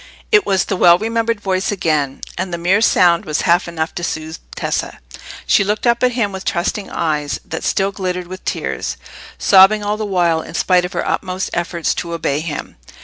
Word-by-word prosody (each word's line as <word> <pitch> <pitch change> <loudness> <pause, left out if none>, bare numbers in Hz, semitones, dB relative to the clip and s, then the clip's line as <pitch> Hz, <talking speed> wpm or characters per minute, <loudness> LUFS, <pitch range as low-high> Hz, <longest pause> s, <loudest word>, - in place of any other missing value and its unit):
It 420 -3 +4
was 190 -1 +2
the 195 - -2
well 175 -1 +6
remembered 230 +1 -1
voice 190 -1 -1
again, 155 -8 -1
and 185 0 -3
the 170 - -2
mere 180 +5 +2
sound 175 -4 +4
was 155 -5 -1
half 175 +2 +2
enough 160 -1 -3
to 175 - -5
soothe 160 0 -4 0.2
Tessa. - - -3 0.5
She 200 - +4
looked 210 +4 -1
up 235 0 +3
at 250 -1 +2
him 230 -4 0
with 190 0 -6
trusting 190 +3 -2
eyes, 150 -3 -2
that - - -5
still 195 0 +1
glittered 180 -2 -3
with 185 +1 -9
tears, - - -3 0.4
sobbing 200 +2 +6
all 205 +1 -1
the 215 - -3
while, 175 -4 +1
in 165 - -10
spite 180 +1 +3
of 180 - -7
her - - -2
utmost 185 0 -2
efforts 170 -1 -1
to 170 -1 -5
obey 145 -3 -1
him. 155 -2 -6
185 Hz, 200 wpm, -18 LUFS, 170-205 Hz, 0.5 s, well